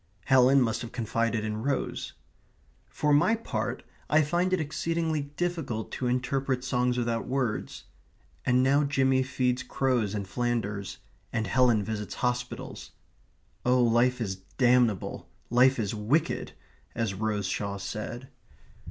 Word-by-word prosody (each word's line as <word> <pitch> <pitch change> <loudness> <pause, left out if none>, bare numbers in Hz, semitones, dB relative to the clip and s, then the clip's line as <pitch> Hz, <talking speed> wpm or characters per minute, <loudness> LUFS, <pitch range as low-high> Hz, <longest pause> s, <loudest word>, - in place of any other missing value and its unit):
Helen 130 +1 +6
must 115 -1 -1
have 120 - -6
confided 115 -1 -1
in 110 0 -3
Rose. 140 +2 -2 0.7
For 150 -1 0
my 175 +10 +4
own 230 - -19
part, - - -3 0.3
I 155 +1 +5
find 175 +5 0
it 185 - +2
exceedingly 160 -1 -1
difficult 165 -11 -2
to 125 - -2
interpret 130 +1 0
songs 125 -1 +1
without 115 -1 -1
words. 125 -5 -2 0.6
And 125 +1 +3
now 140 +3 +4
Jimmy 135 -2 +2
feeds 130 -1 0
crows 125 -5 0
in 100 -1 -3
Flanders 100 -3 -2 0.3
and 110 -2 -1
Helen 120 0 +3
visits 105 0 -4
hospitals. 125 -1 -3 0.7
Oh, 125 0 +4
life 120 +2 +3
is 95 -5 -2 0.2
damnable, 120 -6 +2 0.2
life 130 +2 +5
is 105 -3 -1
wicked, 110 +9 0 0.4
as 115 -4 -1
Rose 105 0 -1
Shaw 100 +1 -2
said. 105 +6 -5
125 Hz, 135 wpm, -28 LUFS, 110-135 Hz, 0.7 s, Helen